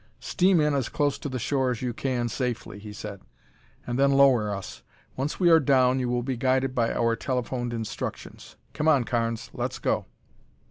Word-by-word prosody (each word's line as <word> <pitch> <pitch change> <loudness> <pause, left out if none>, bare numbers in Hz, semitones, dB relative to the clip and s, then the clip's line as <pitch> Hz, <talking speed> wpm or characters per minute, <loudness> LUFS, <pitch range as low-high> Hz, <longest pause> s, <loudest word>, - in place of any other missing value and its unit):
"Steam 185 -1 +2
in 150 -1 +2
as 135 -4 -1
close 145 -1 0
to 145 - -5
the 130 - -3
shore 130 +2 0
as 125 -1 -3
you 125 -1 -1
can 125 -1 -1
safely," 120 -3 -4
he 105 0 -9
said, 105 -1 -8 0.6
"and 120 +1 -3
then 140 0 +5
lower 130 -6 +4
us. 80 -11 -6 0.3
Once 135 +3 -3
we 175 -2 +5
are 165 - +8
down, 130 -3 +3
you 125 -1 -1
will 120 0 0
be 130 +1 -2
guided 130 +1 +1
by 115 -3 +1
our 115 -1 +1
telephoned 125 0 -2
instructions. 115 -2 -6 0.2
Come 155 - -1
on, 145 -5 +5
Carnes, 115 -1 -2
let's - - -3
go." - - -1
125 Hz, 190 wpm, -26 LUFS, 115-135 Hz, 0.6 s, are